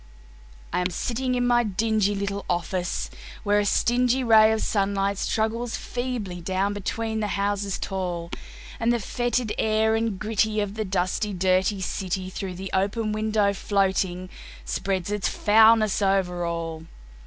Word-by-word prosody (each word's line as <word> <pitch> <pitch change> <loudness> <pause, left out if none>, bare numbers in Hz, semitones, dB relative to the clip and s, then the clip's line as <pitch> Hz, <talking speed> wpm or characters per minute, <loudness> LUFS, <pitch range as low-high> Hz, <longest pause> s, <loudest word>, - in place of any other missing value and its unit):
I - - +1
am 180 0 0
sitting 250 +6 -2
in 245 0 +1
my 240 0 +4
dingy 210 0 +1
little 200 0 -3
office, 175 0 -2 0.3
where 205 0 +3
a 205 - +1
stingy 245 +4 +2
Ray 220 -2 +6
of 220 - 0
sunlight 200 -1 0
struggles 225 +2 -1
feebly 240 -8 -4
down 190 +3 0
between 220 +2 -3
the 210 - -1
houses 200 0 -1
tall, 175 -3 -4 0.5
And 230 +1 +2
the 240 - +2
foetid 240 +1 -1
air 220 0 +2
and 225 -3 0
gritty 215 +1 0
of 205 -1 -2
the 215 0 -3
dusty, 190 +2 -1
dirty 185 +2 +1
city, 185 0 -3
Through 185 -1 -5
the 190 +1 -6
open 210 +3 0
window 215 -1 +1
floating, 190 -2 0 0.4
spreads 195 -1 -2
its 210 -2 0
foulness 220 -1 +4
over 190 -3 +1
all. 165 -1 -4
205 Hz, 145 wpm, -25 LUFS, 190-220 Hz, 0.5 s, Ray